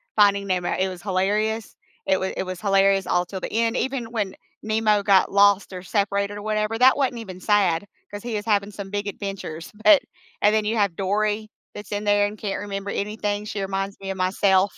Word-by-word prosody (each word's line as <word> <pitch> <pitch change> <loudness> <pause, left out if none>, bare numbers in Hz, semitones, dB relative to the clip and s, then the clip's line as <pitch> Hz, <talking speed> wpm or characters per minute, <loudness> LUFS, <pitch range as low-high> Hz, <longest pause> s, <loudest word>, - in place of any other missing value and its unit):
Finding 200 -1 +4
Nemo. 180 -2 0
It 190 0 +1
was 180 -1 -8
hilarious. 210 +3 -1 0.3
It 190 -1 +2
wa 190 - -2
it - - -2
was 185 -1 -6
hilarious 195 -1 +3
all 180 0 +1
till 190 +1 -6
the - - -5
end. 230 +1 +1
Even 255 -4 -2
when 205 -5 -2 0.3
Nemo 215 -1 +2
got 195 -2 +4
lost 200 0 +4
or 180 -1 -6
separated 200 +1 -1
or - - -7
whatever, 215 +1 -1
that 255 +3 +6
wasn't 260 -4 0
even 190 -5 -8
sad, 195 -3 +2 0.3
'cause 205 0 -7
he 235 -2 -3
is 210 - -3
having 205 -2 +1
some 200 -1 -7
big 205 +1 -3
adventures. 195 -5 -6
But 305 -4 +8 0.4
and 210 +1 +4
then 215 -1 +1
you 220 +2 0
have 200 -5 +1
Dory 210 +2 0 0.2
that's 205 - -9
in 205 0 -2
there 205 0 +3
and 210 +1 -8
can't 200 -2 -3
remember 200 -1 -5
anything. 205 0 -2
She 210 -1 -4
reminds 195 +1 -3
me 195 - -6
of 190 - -3
myself, 190 +1 +2
205 Hz, 210 wpm, -23 LUFS, 195-215 Hz, 0.4 s, But